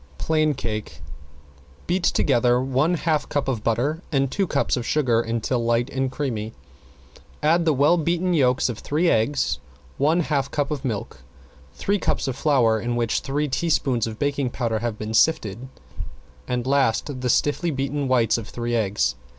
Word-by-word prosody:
~PLAIN 155 -2 +1
CAKE~ 110 -7 -5 0.9
Beat 180 +1 -1
together 125 -3 +3
one 135 +6 +1
half 160 -2 -1
cup 145 -2 -1
of 120 -5 -2
butter 130 +9 0
and 135 -2 +1
two 195 -2 0
cups 140 - +1
of 125 - -3
sugar 120 -4 +2
until 115 +1 -1
light 120 +2 +1
and 135 -1 -1
creamy, 115 -6 -3 0.9
add 165 +3 +3
the 160 - +3
well 145 +6 +4
beaten 175 +2 0
yolks 130 -5 +3
of 120 -4 -4
three 165 +4 +1
eggs, 110 - +1 0.4
one 155 +5 +3
half 140 -4 -1
cup 145 -1 -2
of 145 -2 -3
milk, 110 - -4 0.5
three 200 +1 0
cups - - -1
of 130 - -2
flour 125 -8 +2
in 120 0 -2
which 115 -1 0
three 145 +2 -2
teaspoons 135 -5 0
of 110 -1 -6
baking 140 -1 -1
powder 115 -3 -2
have 115 -1 -3
been 110 +1 -5
sifted, 115 -3 +1 0.8
and 125 -1 -2
last 135 0 +1
the 125 - -1
stiffly 145 +7 +1
beaten 140 0 -2
whites 120 -3 +2
of 110 - -9
three 120 0 -3
eggs. 100 - +1
130 Hz, 165 wpm, -23 LUFS, 115-150 Hz, 0.9 s, well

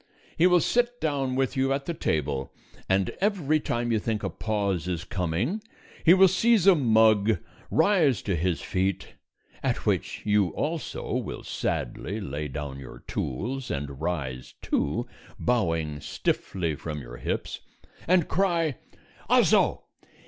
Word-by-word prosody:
He 175 - +5
will 180 -1 +5
sit 245 +4 +1
down 135 -4 -1
with 135 +1 0
you 135 0 +1
at 140 0 -1
the 170 - -2
table, 70 - -1 0.4
and 95 -1 +2
every 175 -7 +2
time 120 -4 -1
you 110 - +2
think 110 0 -2
a 95 - -2
pause 100 -3 -1
is 85 -2 -2
coming 95 - -1 0.4
he 170 +2 +8
will 190 0 +7
seize 205 +2 +3
a 195 - +9
mug, 110 - +4 0.3
rise 160 - +3
to 95 - 0
his 85 +1 0
feet 95 0 -1 0.5
(at - - -1
which - - -1
you 105 -2 +3
also 160 +1 -3
will - - -3
sadly 105 +5 -3
lay 75 -5 -4
down 70 0 -5
your 65 - -11
tools 125 - -3
and 70 0 -4
rise, 70 -7 -3
too, 115 +12 0 0.3
bowing 80 -11 0
stiffly 85 +1 -2
from 75 +1 -5
your - - -9
hips), - - -3 0.5
and 175 -2 +4
cry: 170 -6 +1 0.5
"_Also! - - +4
110 Hz, 140 wpm, -27 LUFS, -, 0.5 s, a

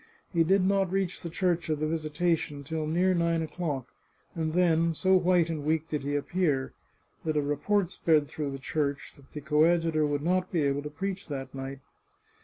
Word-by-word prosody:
He 165 -1 +4
did 190 +3 +3
not 195 -1 +2
reach 190 -2 -1
the 170 - -5
Church 175 -1 0
of 155 -1 0
the 155 - 0
Visitation 155 -1 -1
till 155 +2 -3
near 180 +4 +2
nine 170 -1 +1
o'clock, 155 -6 -3 0.5
and 160 -2 -2
then, 165 -2 +3
so 190 +4 +3
white 180 -2 +3
and 160 -3 -3
weak 160 +1 0
did 150 - -2
he 145 +1 -2
appear, 145 -3 0 0.5
that 155 -1 -1
a - - +3
report 175 +7 0
spread 155 -3 +2
through 150 -1 -4
the 135 - -5
church 140 +1 -2
that 140 -1 -20
the 150 - -7
co 150 +1 +3
adjutor 165 -2 +3
would 145 0 -1
not 185 +2 +1
be 165 -4 +1
able 140 0 +1
to 150 - -6
preach 195 +5 -4
that 135 -4 -5
night. 135 0 -6
160 Hz, 200 wpm, -28 LUFS, 145-175 Hz, 0.5 s, He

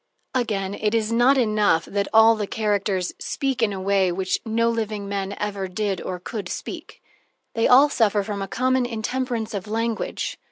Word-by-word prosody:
Again, 205 -6 -1
it 210 +1 -1
is 220 -1 0
not 245 +4 +4
enough 215 -8 +2
that 200 0 -2
all 225 +1 +7
the 210 -2 -3
characters 200 -4 -1
speak 270 -3 -2
in 220 -2 +2
a 195 - -4
way 195 0 +2
in 175 - -1
which 185 0 -1
no 230 +1 +1
living 215 -3 -2
men 200 0 -3
ever 200 -2 -3
did 195 0 -2
or 180 -1 -5
could 210 +3 -6
speak - - -7 0.5
they 225 - +2
all 270 +4 +7
suffer 215 -7 +2
from 200 -1 -4
a 195 - -3
common 255 +3 +1
intemperance 235 0 -3
of 200 -1 -4
language. 225 +1 -2
215 Hz, 185 wpm, -23 LUFS, 200-230 Hz, 0.5 s, all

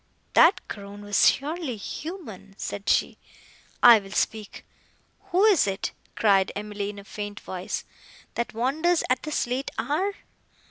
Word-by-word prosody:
"That - - +5
groan 200 0 -8
was 205 -1 +5
surely 295 -3 -3
human!" 220 - -8
said 200 0 -4
she. - - +2 0.6
"I 235 -2 +10
will 195 -1 -12
speak." 215 -1 -2 0.6
"Who 385 0 +2
is 390 - +5
it," 195 0 -2 0.2
cried 195 -3 +3
Emily 205 -1 -4
in 205 - -8
a 200 - -9
faint 205 0 -6
voice, 185 0 -4 0.5
"that 235 -1 -3
wanders 315 +9 +1
at 255 - +2
this 305 -1 -1
late 255 +3 -2
hour?" 375 +8 -1
220 Hz, 140 wpm, -26 LUFS, 200-305 Hz, 0.6 s, I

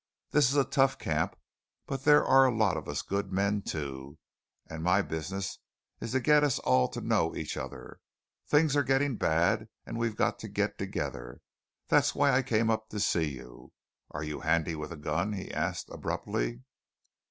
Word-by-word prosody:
This 145 -4 +4
is 140 - -1
a 140 - +5
tough 135 0 +2
camp; - - -1 0.5
but 135 -1 -5
there 150 0 +6
are 135 0 +6
a 125 - 0
lot 105 -6 +3
of 80 - -5
us - - -2
good 100 0 -3
men, 100 +2 +1
too, 70 -5 -5 0.5
and 80 0 -7
my 90 +4 +3
business 95 +5 -4 0.4
is 115 - -5
to 130 - +3
get 150 +2 +4
us 145 -4 +2
all 65 0 +3
to - - -6
know - - +1
each - - -4
other. - - -8 0.5
Things 150 -1 +3
are 145 - +4
getting 135 -1 +1
bad, 105 +7 +1 0.2
and 115 - -5
we've 115 -2 -1
got - - 0
to - - -7
get - - -2
together. - - -4 0.5
That's - - +3
why 145 0 +4
I 130 +1 +4
came 115 -3 +1
up 110 0 -2
to 105 - -5
see 85 -5 +1
you. 60 -1 -13 0.4
Are 75 - -5
you 75 -1 -4
handy 85 +1 +1
with 75 +1 -6
a 85 - -7
gun?" 80 +7 -1
he 95 - -6
asked - - -2
abruptly. - - -3
100 Hz, 185 wpm, -30 LUFS, 80-130 Hz, 0.5 s, there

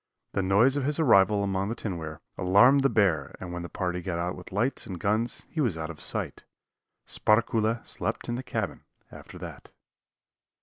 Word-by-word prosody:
The - - +1
noise 105 +9 +4
of 140 - 0
his 145 +2 0
arrival 105 -7 +5
among 100 0 -1
the 115 - -2
tinware 80 -9 -5
alarmed 115 +10 +5
the 135 - +3
bear 85 - +1
and 90 -1 -6
when 90 - -4
the 85 - -6
party 90 -1 -2
got 90 -1 -3
out 85 +1 -2
with 90 - -11
lights 115 +8 0
and 90 -3 -6
guns 110 +5 0
he 160 - -1
was 115 - +1
out 80 0 -4
of 80 - -11
sight. - - -3 0.6
Sparkuhle 110 +1 +1
slept - - -4
in 120 - -2
the 120 - -2
cabin 130 - -3 0.3
after - - -11
that. - - -10
100 Hz, 185 wpm, -27 LUFS, 90-115 Hz, 0.6 s, arrival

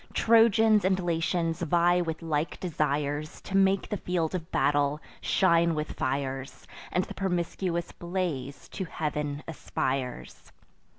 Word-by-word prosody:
Trojans 225 -2 +5
and 190 0 +2
Latians 165 -1 0
vie 175 +2 +3
with 165 -1 -4
like 155 -1 -1
desires 150 -2 -1
To 195 - -5
make 195 0 +3
the 210 - -1
field 175 -3 -1
of 170 -3 -4
battle 145 +1 +2 0.2
shine 170 -3 +3
with 150 0 -3
fires, 135 0 -3 0.3
And 180 - +1
the - - -8
promiscuous 175 -1 -2
blaze 170 -7 -4
to 190 - -4
heav'n 150 -2 -3
aspires. 130 -5 -4
165 Hz, 125 wpm, -28 LUFS, 150-185 Hz, 0.3 s, Trojans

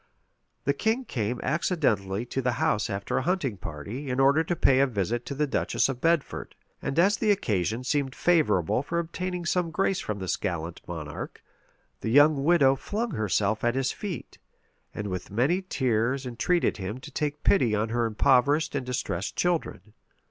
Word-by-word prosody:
The 140 - +2
king 220 - 0
came 120 - -2
accidentally 120 - 0
to 135 +2 -3
the 125 -1 0
house 140 -5 0
after 100 0 -1
a - - -1
hunting 160 - 0
party, 100 - -6
in 125 +1 -1
order 140 +4 +5
to 175 +2 -1
pay 135 -4 +4
a 140 - +4
visit 115 +1 -2
to 140 - -4
the 150 +2 +1
duchess 140 - +1
of 125 -2 -4
Bedford; 165 -2 0 0.3
and 135 - -3
as 195 +4 +4
the 220 - 0
occasion 110 - 0
seemed 135 0 -1
favorable 150 - +2
for 170 +4 -3
obtaining 175 +1 -3
some 175 -1 +1
grace 190 +3 0
from 105 - -3
this 95 -2 -2
gallant 85 -4 -4
monarch, 80 -4 -7 0.6
the - - -3
young 145 +2 +5
widow 145 -4 +5
flung 220 - -3
herself 110 - 0
at 120 +1 +2
his 135 -1 +1
feet, 200 -4 -7 0.5
and 105 - -5
with 90 -3 -4
many 135 - +1
tears 130 - 0
entreated 130 +9 0
him 100 +3 -4
to 150 - -11
take 150 +1 -3
pity 125 - +3
on 105 +2 0
her 120 0 +1
impoverished 140 +7 +3
and 135 -3 -3
distressed 120 -7 -3
children. 110 - -1
130 Hz, 175 wpm, -27 LUFS, 110-160 Hz, 0.6 s, order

